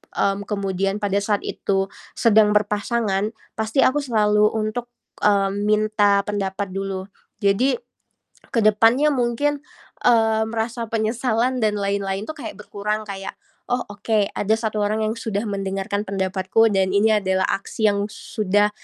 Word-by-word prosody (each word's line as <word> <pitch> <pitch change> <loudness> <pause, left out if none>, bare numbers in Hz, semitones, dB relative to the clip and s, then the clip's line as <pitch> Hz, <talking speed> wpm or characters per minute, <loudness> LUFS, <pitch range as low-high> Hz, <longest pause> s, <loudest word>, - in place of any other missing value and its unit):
mmm, 200 +1 0
kemudian 195 -1 -1
pada 200 -1 +1
saat 205 0 -1
itu 195 -1 -1 0.3
sedang 210 -2 +4
berpasangan, 210 0 0 0.2
pasti 220 +4 +1
aku 285 +3 +3
selalu 210 -4 +3
untuk, 220 +3 -2 0.4
mmm, 200 -1 +2
minta 210 -1 +3
pendapat 200 -1 -3
dulu. 195 0 -3 0.4
Jadi, 200 +7 +3 0.8
ke 250 - -1
depannya 225 +7 +4
mungkin, 260 +4 0 0.5
mmm, 225 -2 +3
rasa 230 +1 -2
penyesalan 230 +2 0
dan 215 -1 +2
lain-lain 200 -1 -1
tuh 315 - -4
kayak 245 - -6
berkurang 210 +1 -3
kayak, 195 -2 -6 0.3
"Oh 245 0 0
oke, 205 0 0
ada 210 +2 0
1 220 -1 -2
orang 215 +2 0
yang 215 +1 0
sudah 215 -2 -2
mendengarkan 195 +1 -3
pendapatku 190 +3 +1
dan 190 -1 +1
ini 215 +2 +4
adalah 190 -1 +1
aksi 215 +2 0
yang 200 0 -1
sudah 205 -1 0
210 Hz, 135 wpm, -22 LUFS, 200-220 Hz, 0.8 s, sedang